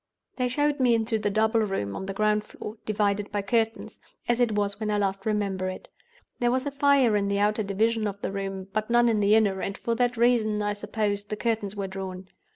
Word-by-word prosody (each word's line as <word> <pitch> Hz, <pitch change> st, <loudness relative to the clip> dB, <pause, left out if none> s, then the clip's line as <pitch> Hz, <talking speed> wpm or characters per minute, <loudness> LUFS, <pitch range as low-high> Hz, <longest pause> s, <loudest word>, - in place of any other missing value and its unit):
"They 250 Hz, -1 st, +1 dB
showed 290 Hz, +3 st, 0 dB
me 245 Hz, -3 st, +4 dB
into 225 Hz, 0 st, 0 dB
the 210 Hz, -1 st, 0 dB
double 220 Hz, +2 st, +2 dB
room 195 Hz, -, -2 dB
on 190 Hz, -, -5 dB
the 195 Hz, -, -3 dB
ground 210 Hz, 0 st, +2 dB
floor, 210 Hz, 0 st, -9 dB
divided 205 Hz, -1 st, 0 dB
by 205 Hz, -1 st, -1 dB
curtains—as 225 Hz, +2 st, -2 dB
it 240 Hz, -3 st, +2 dB
was 205 Hz, -1 st, -1 dB
when 215 Hz, -1 st, -2 dB
I 210 Hz, -, +1 dB
last 195 Hz, 0 st, -1 dB
remember 200 Hz, -3 st, -1 dB
it. 185 Hz, -, -8 dB, 0.5 s
There 240 Hz, -, +2 dB
was 260 Hz, +2 st, 0 dB
a 285 Hz, -, -2 dB
fire 275 Hz, -5 st, +3 dB
in 200 Hz, -1 st, +1 dB
the 200 Hz, 0 st, 0 dB
outer 210 Hz, +2 st, +2 dB
division 215 Hz, +2 st, 0 dB
of 200 Hz, -1 st, -5 dB
the -, -, -3 dB
room, 195 Hz, -1 st, -4 dB
but 215 Hz, +1 st, -1 dB
none 240 Hz, 0 st, +4 dB
in 220 Hz, -2 st, +2 dB
the 205 Hz, +1 st, +4 dB
inner; 200 Hz, -4 st, +2 dB
and 195 Hz, -, -3 dB
for 235 Hz, -, -2 dB
that 245 Hz, +1 st, 0 dB
reason, 225 Hz, -3 st, +2 dB
I 205 Hz, 0 st, 0 dB
suppose, 205 Hz, -1 st, -2 dB
the 210 Hz, -, -4 dB
curtains 215 Hz, -3 st, -1 dB
were 200 Hz, -1 st, -3 dB
drawn. 190 Hz, -1 st, -6 dB
210 Hz, 225 wpm, -26 LUFS, 200-230 Hz, 0.5 s, me